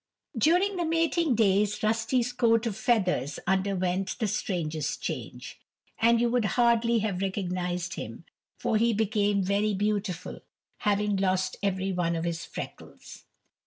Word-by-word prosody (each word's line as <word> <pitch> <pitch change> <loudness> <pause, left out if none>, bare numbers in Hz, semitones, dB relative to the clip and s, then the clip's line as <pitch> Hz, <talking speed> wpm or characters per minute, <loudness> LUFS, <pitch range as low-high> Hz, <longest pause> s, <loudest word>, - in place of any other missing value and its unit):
During 360 - +3
the 350 - 0
mating 330 -3 +1
days 205 -1 +2
Rusty's 225 +3 +1
coat 230 -2 +3
of 220 -4 -2
feathers 195 - +1
underwent 190 0 0
the 225 - 0
strangest 160 -7 -2
change, - - -6 0.4
and 230 +1 +4
you 240 - +3
would 240 -1 +1
hardly 235 -1 +3
have 190 -3 -2
recognized 180 -2 -2
him, - - -7 0.3
for 220 - 0
he 230 +1 +3
became 205 -2 +1
very 200 +2 +1
beautiful, 205 -3 -2 0.4
having 205 0 +1
lost 185 -1 0
every 195 -1 -1
one 175 -2 0
of 165 - -2
his 170 -1 -3
freckles. - - -9
205 Hz, 135 wpm, -28 LUFS, 185-230 Hz, 0.4 s, and